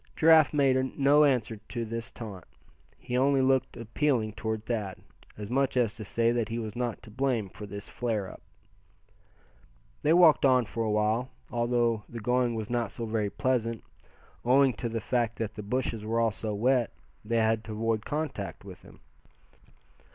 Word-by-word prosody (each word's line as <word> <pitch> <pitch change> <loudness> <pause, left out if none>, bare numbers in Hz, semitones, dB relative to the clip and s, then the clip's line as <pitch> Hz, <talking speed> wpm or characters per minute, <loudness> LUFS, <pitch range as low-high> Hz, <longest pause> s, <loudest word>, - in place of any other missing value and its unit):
Giraffe 160 -2 +6
made 130 -3 +1
no 145 +2 +5
answer 120 -5 +1
to 115 +3 -5
this 115 +1 -5
taunt. 100 -7 -9 0.5
He 125 - -5
only 135 +1 +3
looked 130 0 +1
appealing 115 -1 0
toward 110 0 -4
Thad, 105 -6 -3 0.4
as 105 +1 -7
much 135 0 +1
as 115 -4 +2
to 120 -3 -8
say 115 +3 +1
that 120 -2 -1
he 115 - -3
was 110 -3 -5
not 120 -2 -3
to 110 - -13
blame 120 -4 -1
for 105 +2 -9
this 100 0 -8
flare 110 -5 -2
up. - - -11 1.6
They 150 - +2
walked 170 -3 +6
on 130 -3 +4
for 115 +1 -3
a 110 - -1
while, 110 +4 +1 0.2
although 120 -1 +1
the 120 - -7
going 125 +1 +1
was 110 -2 -4
not 120 -3 -1
so 115 +3 -5
very 110 -2 -1
pleasant, 115 -1 -1 0.6
owing 130 +2 +4
to 115 +2 -4
the 115 0 -3
fact 120 0 0
that 110 -1 -3
the 105 - -7
bushes 115 0 -2
were 115 +2 -1
all 115 -1 +2
so 105 0 -4
wet, 120 +2 +2 0.3
they 115 +2 -1
had 110 0 +2
to 110 - -6
avoid 110 0 -1
contact 120 - -4
with 95 -2 -11
them. - - -17
115 Hz, 180 wpm, -28 LUFS, 110-130 Hz, 1.6 s, Giraffe